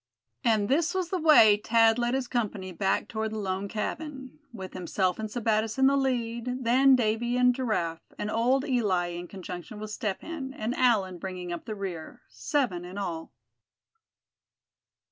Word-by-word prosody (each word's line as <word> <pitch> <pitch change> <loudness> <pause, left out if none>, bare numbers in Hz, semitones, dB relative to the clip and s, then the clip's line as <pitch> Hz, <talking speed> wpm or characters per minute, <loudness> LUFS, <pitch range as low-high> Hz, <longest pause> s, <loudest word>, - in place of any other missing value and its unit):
And 220 -4 +2
this 320 - +1
was 370 -2 -1
the 370 - 0
way 220 -10 +7
Thad 225 0 +4
led 240 +1 +1
his 265 -2 -2
company 210 -6 -2
back 195 +2 0
toward 220 0 -3
the - - -3
lone 195 -1 -2
cabin, 265 +6 -5
with 190 -5 -8
himself 185 +1 -1
and 220 -1 -3
Sebattis 220 0 0
in 265 - +4
the 275 +1 +5
lead, 250 -1 -1
then 260 +3 +5
Davy 240 +1 0
and 250 0 +5
Giraffe; 215 -10 -2 0.2
and 210 - -3
old 255 +4 +2
Eli, 200 -9 +1
in 175 0 -6
conjunction 185 +1 -8
with 215 0 -6
Step 210 -3 -3
Hen 280 -5 -6
and 230 -2 -2
Allan, 210 -9 +2
bringing 180 -1 -5
up 170 - -7
the 215 - -5
rear,—seven 190 - -3
in 180 +2 -9
all. 170 -5 -4
220 Hz, 165 wpm, -28 LUFS, 190-255 Hz, 0.2 s, way